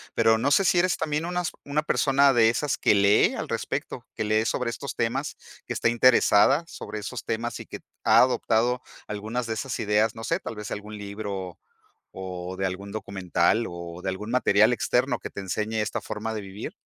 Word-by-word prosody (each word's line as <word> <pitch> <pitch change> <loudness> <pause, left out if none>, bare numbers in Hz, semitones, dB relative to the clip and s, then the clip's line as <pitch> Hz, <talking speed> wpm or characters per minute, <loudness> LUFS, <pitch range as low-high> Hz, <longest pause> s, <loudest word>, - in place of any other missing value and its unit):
pero 115 -1 +4
no 135 +5 0
sé 195 +7 +4
si 180 - +4
eres 185 0 +2
también 150 +1 -1
unas 180 -1 -2
una 145 +2 0
persona 140 -2 +3
de 115 -1 +5
esas 140 +4 -1
que - - +3
lee 100 0 +4
al - - -4
respecto, - - -4
que - - -2
lee 110 +1 +2
sobre 125 0 -1
estos 140 +4 -6
temas, 130 +6 -1 0.3
que - - -9
está - - 0
interesada 120 +4 +4
sobre 105 -8 -7
esos 115 +4 -6
temas 115 +1 -3
y - - -10
que - - -8 0.2
ha - - +5
adoptado 125 0 +2 0.3
algunas 110 +4 -3
de 115 - -1
esas 130 +4 -4
ideas, 105 +1 +2
no 115 -1 -7
sé, 165 - 0
tal 115 - -6
vez 105 - -6
algún 105 +1 -6
libro 100 -3 -6 0.6
o 90 -1 -6
de 95 - -1
algún 95 +2 -4
documental 100 +1 0
o 85 0 -8
de 95 - -2
algún 105 +5 -5
material 110 -3 +4
externo 125 -1 +1
que - - -7
te - - -8
enseñe 105 +3 -2
esta 105 - -2
forma 110 +1 -4
de 110 - -4
vivir. 100 - -7
110 Hz, 200 wpm, -26 LUFS, 100-125 Hz, 0.6 s, de